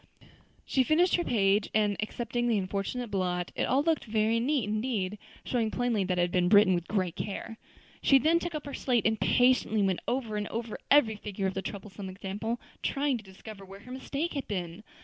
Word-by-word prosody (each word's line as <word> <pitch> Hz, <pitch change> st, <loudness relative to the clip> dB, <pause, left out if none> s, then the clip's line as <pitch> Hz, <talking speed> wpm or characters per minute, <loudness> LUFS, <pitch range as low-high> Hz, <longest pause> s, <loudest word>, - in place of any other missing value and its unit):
She 260 Hz, -, +2 dB
finished 330 Hz, +7 st, +3 dB
her 345 Hz, -, 0 dB
page, 200 Hz, -4 st, +2 dB
and, 210 Hz, -2 st, +3 dB
excepting 240 Hz, +2 st, -2 dB
the 230 Hz, -3 st, +2 dB
unfortunate 200 Hz, +5 st, -3 dB
blot, 180 Hz, -2 st, -1 dB
it -, -, 0 dB
all 270 Hz, +3 st, +2 dB
looked 320 Hz, -1 st, +1 dB
very 220 Hz, +1 st, +1 dB
neat 270 Hz, +1 st, +1 dB
indeed, 210 Hz, -3 st, -2 dB, 0.3 s
showing 230 Hz, -3 st, 0 dB
plainly 240 Hz, -3 st, 0 dB
that 180 Hz, -1 st, -1 dB
it -, -, +3 dB
had 175 Hz, -, -1 dB
been 180 Hz, 0 st, +2 dB
written 205 Hz, -2 st, +6 dB
with 175 Hz, -1 st, -2 dB
great 185 Hz, -5 st, -1 dB
care. 220 Hz, +3 st, -5 dB, 0.4 s
She 275 Hz, -, +6 dB
then 320 Hz, +6 st, +3 dB
took 345 Hz, -1 st, -4 dB
up 300 Hz, -, -5 dB
her 285 Hz, -, -6 dB
slate 245 Hz, -4 st, 0 dB
and 220 Hz, -1 st, +1 dB
patiently 245 Hz, -4 st, +3 dB
went 190 Hz, -2 st, +1 dB
over 240 Hz, -4 st, -1 dB
and 210 Hz, 0 st, -2 dB
over 230 Hz, -1 st, -5 dB
every 235 Hz, -7 st, +5 dB
figure 200 Hz, -1 st, -4 dB
of 190 Hz, -, 0 dB
the 195 Hz, -, -3 dB
troublesome 195 Hz, -1 st, -7 dB
example, 200 Hz, +5 st, -4 dB, 0.2 s
trying 275 Hz, -3 st, 0 dB
to -, -, -12 dB
discover 195 Hz, +1 st, -11 dB
where 195 Hz, +1 st, -12 dB
her 250 Hz, -, -12 dB
mistake 280 Hz, +5 st, -3 dB
had 280 Hz, -2 st, -4 dB
been. 175 Hz, -2 st, -4 dB
215 Hz, 205 wpm, -29 LUFS, 195-250 Hz, 0.4 s, written